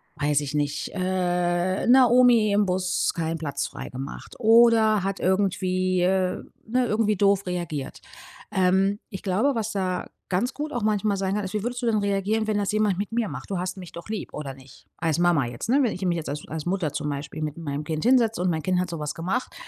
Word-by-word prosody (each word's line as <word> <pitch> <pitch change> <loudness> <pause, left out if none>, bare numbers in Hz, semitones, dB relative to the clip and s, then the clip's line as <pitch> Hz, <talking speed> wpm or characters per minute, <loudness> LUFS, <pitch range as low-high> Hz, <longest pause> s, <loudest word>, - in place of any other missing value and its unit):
weiß 145 -1 +1
ich 145 -1 -5
nicht, 145 0 -1
äh, 180 0 0
'ner 250 -1 +7
Omi 240 -4 +5
im 205 0 +3
Bus 185 -1 0
keinen 165 0 -2
Platz 140 -3 -3
frei - - -8
gemacht 135 +2 -8
oder 225 -3 +5
hat 195 0 -2
irgendwie, 185 -1 +1
äh, 185 0 +1 0.2
ne, 250 +3 +1
irgendwie 215 -1 +1
doof 200 0 +3
reagiert. 170 -6 -4 0.5
Ähm, 190 +2 +2
ich 190 - -6
glaube, 210 +9 +1
was 220 -1 -2
da 185 -2 -2 0.2
ganz 210 +8 0
gut 300 0 -4
auch 240 - -2
manchmal 210 -1 +1
sein 195 +1 -1
kann, 210 - -1
ist: 190 - -6
„Wie 210 - -1
würdest 245 +1 -3
du 240 - -2
denn 225 -2 +2
reagieren, 200 +2 0
wenn 215 - +1
das 205 0 0
jemand 210 -3 +1
mit 200 +2 -3
mir 230 -1 0
macht? - - -8
Du 190 - -1
hast 185 +1 -3
mich 180 -3 -9
doch 170 - -10
lieb, 220 - -5
oder 140 -3 -5
nicht?“ 130 -1 -17
Als 165 -1 0
Mama 175 -6 +3
jetzt, 120 - -6
ne? 270 +4 +4
Wenn 235 - +1
ich 185 - -6
mich 175 -1 +1
jetzt 160 - -5
als 150 +1 -5
als 155 -1 -5
Mutter 175 -5 -1
zum 150 - -2
Beispiel 140 +2 -5
mit 150 0 -4
meinem 145 -3 -4
Kind 155 0 -3
hinsetze 235 -5 +3
und 180 - +1
mein 160 -2 -1
Kind 185 -1 +1
hat 180 - -1
sowas 150 -3 -4
gemacht. 190 +10 -2
185 Hz, 225 wpm, -25 LUFS, 170-215 Hz, 0.5 s, ner